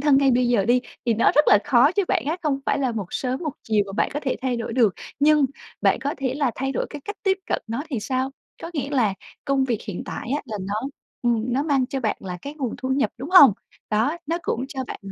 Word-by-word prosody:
thân 280 -1 +5
ngay 275 -1 +4
bây 245 0 +3
giờ 235 -5 +3
đi, 245 +4 +3 0.3
thì 230 - +3
nó 225 - +3
rất 295 - +6
là 205 - +7
khó 280 +1 +5
cho 405 - +2
bạn - - +1
á, 315 +3 0
không 285 -3 0
phải - - +2
là 260 -3 0
một 210 -5 -3
sớm 255 +1 -2
một 305 -4 -2
chiều 215 -2 +2
mà 195 - -7
bạn 200 - 0
có 290 - -1
thể 265 - -1
thay 255 -2 0
đổi 230 0 -4
được. 225 -5 +3 0.3
Nhưng 300 0 +5 0.4
bạn - - +3
có 285 +1 -2
thể 260 -1 -1
là 280 -3 +1
thay 270 +1 -2
đổi - - -1
cái 295 - -7
cách 410 - -5
tiếp 385 -2 +2
cận - - -1
nó 230 +5 -3
thì 250 -6 -2
sao? 260 +4 -1 0.3
Có 330 - -5
nghĩa 280 -1 -2
là 235 -9 +2 0.3
công 275 -2 +2
việc 240 -4 -1
hiện 195 -4 -4
tại 240 - -6
á - - -5
là 220 -5 -5
nó, 200 +2 -3 0.5
ừm, 240 0 +1
nó 270 +3 +1
mang 275 -4 +1
cho 270 +1 -3
bạn 220 -4 0
là 180 -2 -6
cái 285 - -6
nguồn 265 -6 -3
thu 260 - -4
nhập, 270 +1 +1
đúng 280 +7 -6
hông? 325 - +9 0.4
Đó, 225 +9 +1
nó 335 +3 -1
cũng 250 -4 -1
cho 265 -2 -4
bạn - - -7
260 Hz, 270 wpm, -23 LUFS, 230-285 Hz, 0.5 s, hông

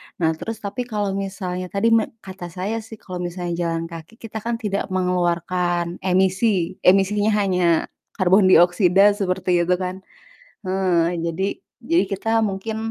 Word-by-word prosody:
nah 165 -5 +1
terus 220 +7 -6
tapi 240 +5 -4
kalo 210 -3 -1
misalnya 190 -2 -4
tadi 200 +5 +1
me 225 -1 +4 0.2
kata 190 -2 -8
saya 195 +6 -3
sih 220 0 -10
kalo 185 -3 -8
misalnya 175 0 -4 0.2
jalan 165 0 -2
kaki 165 +6 -10
kita 225 -2 -7
kan 235 +2 -2
tidak 210 -4 -2
mengeluarkan 175 -1 0
emisi, 185 0 +1
emisinya 205 +3 +4
hanya 180 -3 +1 0.5
karbon 190 0 +4
dioksida 185 +2 +5
seperti 185 -2 +1
itu 180 - +3
kan, 185 +1 -4 0.6
eee, 180 -2 +1
jadi, 180 +4 -1 0.4
jadi 335 +1 +4
kita 195 +3 -3 0.2
mungkin, 205 +3 -3
190 Hz, 145 wpm, -22 LUFS, 180-205 Hz, 0.6 s, dioksida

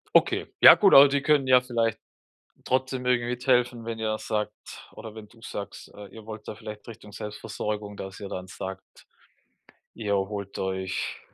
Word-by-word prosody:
Okay, - - +3
ja, - - +11
gut, 200 - +4
aber 140 +1 +10
die 140 0 0
können 145 -2 +2
ja 125 -1 +6
vielleicht 115 -3 -1 0.7
trotzdem 130 0 -1
irgendwie 120 -1 +1
mithelfen, 125 -2 +1
wenn 115 -1 -5
ihr 110 -1 -1
sagt 105 -1 -2 0.4
oder 110 -1 -9
wenn 110 -1 -10
du 115 - -21
sagst, 100 -4 -8
äh, 100 -1 -10
ihr 110 -1 -13
wollt 110 -1 -9
da - - -6
vielleicht 105 +2 -10
Richtung 105 -2 -11
Selbstversorgung, 105 0 -5
dass 95 -1 -8
ihr 100 - -6
dann 95 0 -6
sagt, 95 +1 -7 1.1
ihr 105 -3 -1
holt 100 0 -4
euch, 95 -1 -3
110 Hz, 170 wpm, -26 LUFS, 100-125 Hz, 1.1 s, ja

